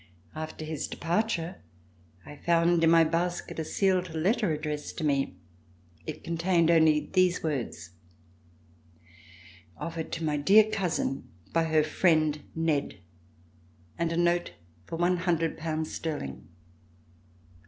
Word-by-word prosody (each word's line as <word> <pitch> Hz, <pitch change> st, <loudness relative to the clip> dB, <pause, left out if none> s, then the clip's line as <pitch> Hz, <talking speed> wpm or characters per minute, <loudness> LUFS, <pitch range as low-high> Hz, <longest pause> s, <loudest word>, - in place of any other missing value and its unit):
After 155 Hz, 0 st, -6 dB
his 155 Hz, -1 st, -4 dB
departure 175 Hz, -1 st, -2 dB, 0.6 s
I 145 Hz, -, -10 dB
found 170 Hz, +1 st, +2 dB
in 165 Hz, -, +6 dB
my 165 Hz, 0 st, +6 dB
basket 170 Hz, +2 st, -2 dB
a -, -, -1 dB
sealed 185 Hz, 0 st, 0 dB
letter 185 Hz, +4 st, +1 dB
ad 150 Hz, -1 st, -2 dB
dressed 150 Hz, -1 st, -4 dB
to 160 Hz, -, -3 dB
me. 140 Hz, -8 st, 0 dB, 0.7 s
It 155 Hz, 0 st, -6 dB
contained 170 Hz, 0 st, +2 dB
only 160 Hz, -2 st, +3 dB
these 185 Hz, -1 st, +3 dB
words: 135 Hz, -, -3 dB, 1.9 s
"Offered 165 Hz, +1 st, -5 dB
to 165 Hz, -, -3 dB
my 150 Hz, -2 st, 0 dB
dear 195 Hz, +9 st, +6 dB
cousin 180 Hz, -9 st, -2 dB, 0.2 s
by 165 Hz, 0 st, +2 dB
her 155 Hz, -1 st, +3 dB
friend, 155 Hz, -2 st, +2 dB
Ned," 160 Hz, -3 st, 0 dB, 1.0 s
and 170 Hz, -1 st, -1 dB
a 165 Hz, -, -1 dB
note 175 Hz, -, +1 dB, 0.3 s
for -, -, -5 dB
one 175 Hz, +2 st, +2 dB
hundred 170 Hz, -2 st, 0 dB
pounds 155 Hz, 0 st, -3 dB
sterling. 110 Hz, -, -5 dB
165 Hz, 125 wpm, -28 LUFS, 155-175 Hz, 1.9 s, in